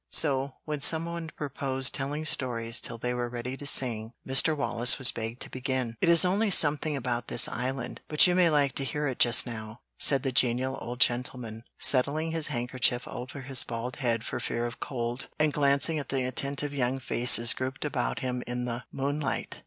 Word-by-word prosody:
So, 135 -3 +3
when 150 -2 -4
some 160 +3 +2
one 170 -1 -6
proposed 135 -2 +1
telling 145 +3 -4
stories 115 -5 0
till 115 - -5
they 125 +2 -3
were 120 0 -3
ready 125 +2 -6
to 145 +1 -4
sing, 115 -4 +2
Mr. 140 +4 +4
Wallace 120 -3 +3
was 130 - +4
begged 115 +1 -6
to - - -9
begin. 130 -2 -3
"It - - +2
is 170 +1 +6
only 200 +4 +1
something 150 -3 +3
about 120 -2 -3
this 115 - +3
island, 125 0 -5
but 150 - +6
you 180 - +3
may 180 -1 +3
like 145 -3 +1
to 140 - +2
hear 150 +2 -3
it 130 -3 -4
just 120 -1 +5
now," 110 -1 -9 0.2
said 135 -3 +5
the 135 - -1
genial 125 +1 +1
old 120 +1 -7
gentleman, 120 -2 -1
settling 150 +5 +2
his 165 -2 -1
handkerchief 125 -2 -1
over 130 +3 -8
his 130 0 +1
bald 120 +2 -6
head 115 -4 -1
for - - -5
fear 120 0 -3
of 120 -1 -7
cold, 120 0 -5
and 155 -1 +1
glancing 140 +2 +1
at 140 - -8
the 135 -1 -1
attentive 140 +3 -3
young 130 -1 -1
faces 120 -2 +4
grouped 130 +3 -5
about 140 -4 -3
him 125 -1 -3
in 125 0 -4
the 120 0 -5
moonlight. 140 -1 -4
130 Hz, 195 wpm, -27 LUFS, 120-145 Hz, 0.2 s, is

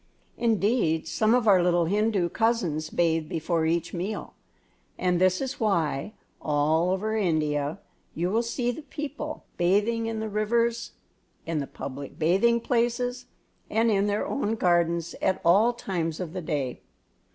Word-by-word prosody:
Indeed, 215 -7 +1
some 220 +2 +2
of 245 -3 +1
our 190 -3 +6
little 175 -1 +2
Hindu 205 -1 +1
cousins 180 -10 0
bathe 165 -2 +1
before 165 0 0
each 170 0 -1
meal; 190 +4 -4 0.6
and 180 -1 +1
this 185 0 +3
is 265 0 -4
why, 170 - 0 0.3
all 155 +3 +2
over 210 +4 -1
India, 155 -5 0 0.4
you 175 +3 -1
will 225 +3 +2
see 240 +1 -1
the 280 - -7
people 300 +1 -6
bathing 210 +6 +2
in 225 -1 -3
the 220 - -3
rivers, 230 +3 0 0.5
in 165 -2 -1
the 140 - -3
public 140 0 -8
bathing 195 +9 +3
places, 245 +1 -1 0.4
and 225 +1 +2
in 200 0 +2
their 205 0 0
own 225 -5 -1
gardens 170 -3 +1
at 190 -1 +1
all 200 +8 +5
times 170 -9 -3
of 175 -3 -5
the 185 - -4
day. 145 -6 -3
190 Hz, 150 wpm, -26 LUFS, 165-225 Hz, 0.6 s, our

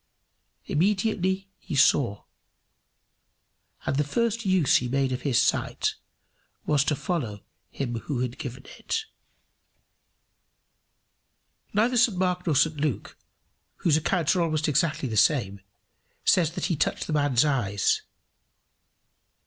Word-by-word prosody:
Immediately 190 +2 0
he - - -6
saw; 120 -6 +3 1.6
and 135 - -1
the 150 - +3
first 230 +7 -1
use 185 -7 +4
he 125 - -2
made 135 +1 0
of 125 - -3
his 135 -5 +2
sight - - 0 0.7
was 145 -2 +3
to 150 - +1
follow 125 - -3 0.3
him 130 -4 -4
who 130 0 -3
had 125 -1 -4
given 130 0 -7
it. 445 -1 -2 2.7
Neither 230 +5 +2
St 235 -5 +3
Mark 180 -1 -1
nor 155 - +2
St 150 +2 +2
Luke, 145 -6 -2 0.6
whose 160 -4 +2
accounts 165 +2 +1
are 180 - +1
almost 155 -2 0
exactly 150 -1 +1
the 110 - -4
same, 100 -5 +2 0.6
says 165 -3 +3
that - - -3
he 175 -2 0
touched 145 - -1
the 155 - -4
man's 145 -3 +3
eyes. 105 -9 +1
150 Hz, 125 wpm, -26 LUFS, 130-180 Hz, 2.7 s, use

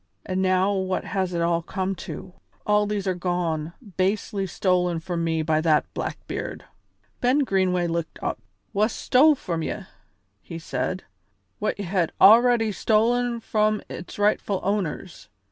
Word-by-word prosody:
And 185 0 -1
now 185 +1 +2
what 190 -1 -1
has 190 -2 -1
it 170 -1 -1
all 170 0 +1
come 190 +3 -2 0.2
to? 185 - -7 0.3
All 210 0 +3
these 205 -1 -2
are 190 - +1
gone, 175 -3 -2 0.2
basely 195 +1 0
stolen 180 -2 +1
from 170 0 -3
me 160 -1 0
by 155 0 +1
that 155 -2 +3
Blackbeard." - - -5 0.5
Ben 260 +4 +3
Greenway 185 -5 +1
looked 170 -1 -3
up. - - -3 0.3
"Wha 210 +2 +3
stole 280 +6 +4
from 170 -10 -3
ye," - - -3 0.6
he 165 - -8
said, 180 +3 -3 0.6
"what - - -1
ye 200 - -4
had 175 -2 0
already 230 +1 +6
stolen 235 +3 +1
from 215 -1 +1
its 175 - -8
rightful 205 -1 +1
owners. 185 - -3
190 Hz, 145 wpm, -24 LUFS, 170-210 Hz, 0.6 s, already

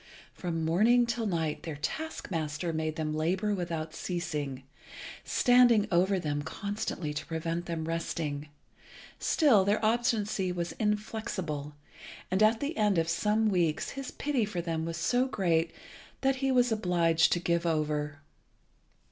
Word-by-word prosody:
From 165 -3 -3
morning 225 +9 +4
till 235 -1 -2
night 160 -5 -1
their 160 -3 -5
task 275 - -4
master 160 0 -2
made 155 0 -2
them 155 -2 -2
labour 185 +7 0
without 165 -4 -3
ceasing, 150 -7 -3 0.6
standing 245 -4 +5
over 185 +3 +3
them 150 -4 -2
constantly 190 -1 -4
to 150 - -4
prevent 165 +1 -3
them 165 -2 -3
resting. 155 -3 -3 0.7
Still 255 -11 +4
their 200 +2 +2
obstinacy 215 -4 +1
was 175 -1 -3
inflexible, 210 -9 -2 0.6
and 190 +2 +1
at 220 +1 +4
the 290 +3 -2
end 210 -3 +3
of 165 0 +1
some 210 +6 +2
weeks 175 -6 +1
his 275 -1 -6
pity 280 -5 -1
for 205 -4 -3
them 165 -1 -2
was 165 -1 -4
so 245 +10 +2
great 170 -8 +1 0.5
that 270 0 +2
he 270 0 0
was 245 -2 +3
obliged 170 -6 +3
to 175 - 0
give 170 0 0
over. 150 -2 -1
175 Hz, 145 wpm, -30 LUFS, 160-215 Hz, 0.7 s, standing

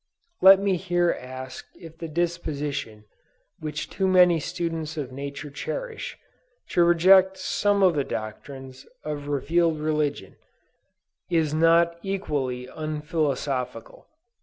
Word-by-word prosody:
Let 190 +1 +9
me 195 -2 +1
here 175 -1 +1
ask 130 +1 -8
if 165 -1 -12
the 165 - -5
disposition 150 -9 -3 0.5
which 150 -1 -4
too 190 - -1
many 180 -3 +5
students 165 -1 -4
of 135 -4 -4
nature 140 +2 -7
cherish, 465 - -5 0.5
to 175 - +3
reject 185 +3 +5
some 200 +1 +1
of 185 -2 +5
the 145 -3 0
doctrines 130 +4 -7 0.2
of 145 -1 -5
revealed 160 +3 +1
religion, 150 -8 -2 0.9
is 160 -4 +1
not 165 +1 +3
equally 145 -11 -3
unphilosophical. 150 -5 -3
155 Hz, 110 wpm, -25 LUFS, 140-175 Hz, 0.9 s, Let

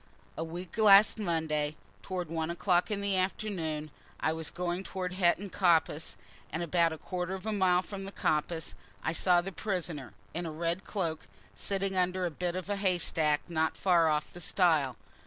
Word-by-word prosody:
A 160 - -2
week 175 +5 -7
last 210 +1 +7
Monday, 160 -5 0 0.3
towards 180 -4 -4
one 160 -1 -1
o'clock 175 +2 +2
in 205 -2 -2
the 200 -1 +1
afternoon, 175 -6 -2 0.3
I 160 - +1
was 160 -2 -3
going 175 +2 -2
towards 185 -1 -4
Hetton 185 +2 +2
Coppice, 165 -4 +2 0.3
and 160 +3 -2
about 170 0 +2
a 160 - -5
quarter 180 +3 -3
of 190 - -9
a 220 - -1
mile 185 -2 +3
from 195 0 -6
the 195 - -6
coppice 160 -2 -1 0.3
I 160 - +1
saw 175 +1 +4
the 195 +2 -5
prisoner, 170 - -3 0.2
in 175 0 -3
a - - -4
red 170 +4 -2
cloak, 165 -6 -3 0.3
sitting 195 - -1
under 185 0 +1
a 175 - -1
bit 175 +2 -2
of 185 -1 -4
a 205 0 -1
haystack 170 -6 +2
not 160 -2 0
far 170 -4 +4
off 150 0 -1
the 175 - -9
stile. 160 - +2
175 Hz, 180 wpm, -31 LUFS, 160-190 Hz, 0.3 s, last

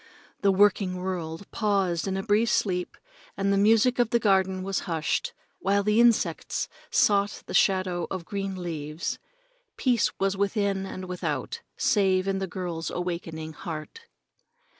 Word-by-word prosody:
The 200 - +4
working 195 -1 +3
world 180 -1 -4
paused 195 -5 0
in 190 0 -1
a 195 - -2
brief 220 +2 +2
sleep 180 -4 0 0.4
and 200 0 +1
the - - +3
music 225 +5 +4
of 240 -2 +3
the 235 - +3
garden 190 -3 +2
was 195 0 -1
hushed, 165 - -1 0.3
while 200 - +2
the 210 +2 +3
insects 235 -2 +2 0.2
sought 200 0 +2
the - - -7
shadow 185 -3 +2
of 185 -3 -5
green 195 0 -3
leaves. 155 -1 -4 0.6
Peace 245 -5 +2
was 195 0 +1
within 200 -1 0
and 185 -1 -6
without, 165 -7 -3 0.2
save 195 -8 +2
in 195 0 0
the 190 - -2
girl's 170 -2 -4
awakening 165 -3 -4
heart. 165 - -7
195 Hz, 145 wpm, -27 LUFS, 180-205 Hz, 0.6 s, The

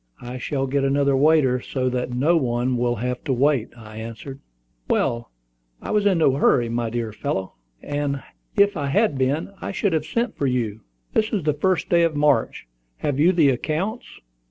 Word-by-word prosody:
I 125 +1 -6
shall 135 +2 -2
get 135 +1 0
another 140 0 +2
waiter, 140 -3 +4
so 130 0 -2
that 125 0 -2
no 135 +8 +2
one 125 -3 0
will 120 0 0
have 125 +3 -3
to 140 - -1
wait," 130 -2 +2
I 110 -1 -11
answered. 115 +5 -8 0.5
"Well, 120 0 0 0.5
I - - -6
was 210 -1 +2
in 190 -3 +3
no 155 -4 +4
hurry, 120 -4 +3
my 115 0 -1
dear 115 -2 -3
fellow: 95 -6 -3 0.3
if 145 +8 -1
I 145 -4 -2
had 200 +3 +2
been, 140 +8 0
I - - -4
should 200 -2 0
have 155 -1 0
sent 235 +9 -1
for 140 - -1
you. 115 -4 -1 0.3
This 220 0 +1
is 200 -6 -1
the 150 0 +2
first 185 +5 0
day 170 -1 +4
of 165 -2 +2
March. 145 - +1 0.3
Have 145 - -2
you 165 +5 +5
the 165 -6 +4
accounts?" 165 - -2
140 Hz, 185 wpm, -23 LUFS, 125-160 Hz, 0.5 s, you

